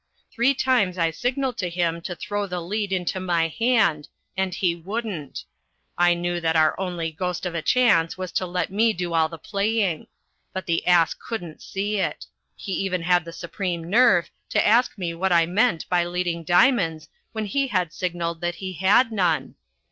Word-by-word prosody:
Three 270 +4 +2
times 240 -9 +1
I 165 -2 +1
signalled 250 - -2
to 180 - -1
him 170 -1 -1
to 180 - -4
throw 205 +2 -3
the 180 -1 -3
lead 200 +4 -3
into 185 0 -1
my 170 -3 +1
hand 220 -8 +1 0.3
and 190 0 -1
he 175 -1 0
wouldn't: 190 - -5 0.5
I 175 0 +4
knew 175 0 -2
that 160 -1 +1
our 155 -1 +4
only 175 -4 -3
ghost 180 +3 -3
of 180 - -3
a 170 - -2
chance 190 -8 +3
was 185 -2 -5
to 185 - -1
let 180 0 -2
me 220 +3 +3
do 175 -2 -4
all 160 -1 +3
the 165 - -8
playing. 200 -1 -1 0.5
But 190 - -4
the 165 0 -1
ass 175 -2 +4
couldn't 175 -9 -7
see 205 +2 -3
it. - - -2 0.3
He 200 - -7
even 185 -2 -1
had 175 -1 +2
the 165 - -7
supreme 170 0 -4
nerve 200 -7 +4 0.2
to - - +2
ask 235 +3 +3
me 175 -3 -3
what 185 +3 -1
I 170 -1 +5
meant 185 +1 +1
by 175 -1 +2
leading 175 -1 -2
diamonds 175 - +3 0.2
when 220 -1 -3
he 275 +7 0
had 185 -8 -1
signalled 170 -2 -3
that 175 0 -2
he 190 -1 -6
had 200 +7 +3
none. 180 -7 0
180 Hz, 185 wpm, -24 LUFS, 170-205 Hz, 0.5 s, I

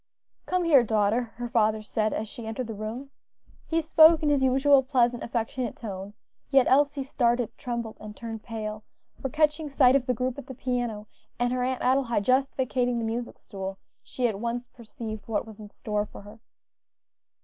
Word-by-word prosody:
"Come 365 -1 +1
here, 305 -6 +6
daughter," 220 +1 +1
her 240 +1 -4
father 220 -2 +1
said 215 +1 -1
as 220 - -3
she 225 +1 -8
entered 235 +3 -3
the 225 - -6
room. 220 +6 -6 0.6
He 330 0 0
spoke 320 0 +6
in 300 - +3
his 285 -2 +3
usual 265 +1 +5
pleasant, 245 -3 +1
affectionate 235 +1 -3
tone, 200 -2 -7 0.3
yet 270 -2 +5
Elsie 280 0 +3
started, 240 -3 0
trembled, 235 -3 -5
and 210 0 -10
turned 225 -2 -6
pale; 215 -2 -5 0.4
for 270 - -2
catching 305 +1 +1
sight 270 -2 +5
of 265 -2 +1
the 250 - +1
group 255 +3 -2
at 275 - -10
the 265 - -8
piano, 240 -4 -2 0.3
and 245 +1 0
her 255 - -1
Aunt 255 0 -1
Adelaide 250 -5 +2
just 265 +2 +2
vacating 250 -2 0
the 230 - -1
music 235 +2 -4
stool, 195 -1 -7 0.2
she 250 -1 -1
at 205 -4 -3
once 235 +2 -3
perceived 220 -3 -8
what 225 0 -1
was 220 -1 -12
in 210 - -9
store 210 0 -3
for - - -12
her. 210 +2 -13
240 Hz, 185 wpm, -27 LUFS, 220-265 Hz, 0.6 s, here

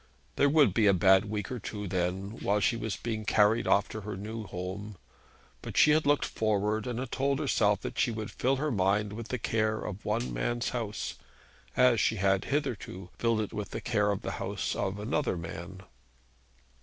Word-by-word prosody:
There 145 - +4
would 140 - +5
be 110 +1 +3
a 100 - +5
bad 95 +2 +5
week 105 0 -4
or 125 - -3
two 105 -1 -5
then 95 +3 -2
while 105 +1 +1
she 115 - +2
was 110 -2 -3
being 110 -2 -3
carried 105 +1 +3
off 100 +1 +4
to 110 - -6
her 105 -1 -5
new 110 +2 -6
home; 95 +3 -6 0.6
but - - -7
she 150 - +7
had 155 -1 +3
looked 145 0 +3
forward 105 0 0
and 120 -2 -3
had 125 0 -4
told 140 +1 +1
herself 105 -5 +2
that - - -5
she - - +3
would 110 -2 -4
fill 130 +2 +1
her 150 +2 -1
mind 100 0 +1
with 115 +1 -6
the 125 - -2
care 110 -1 0
of 105 -1 -6
one 115 +4 -1
man's 120 0 -1
house, 115 -4 -4 0.6
as 125 -3 +5
she 110 - +2
had 95 -1 +1
hitherto 120 - -3
filled 115 -2 +2
it 105 - -5
with 105 -2 -4
the - - -4
care 105 -4 +1
of 100 -1 -1
the - - -3
house - - -2
of 100 0 -2
another 110 0 -1
man. 85 +3 -7
105 Hz, 200 wpm, -29 LUFS, 100-120 Hz, 0.6 s, she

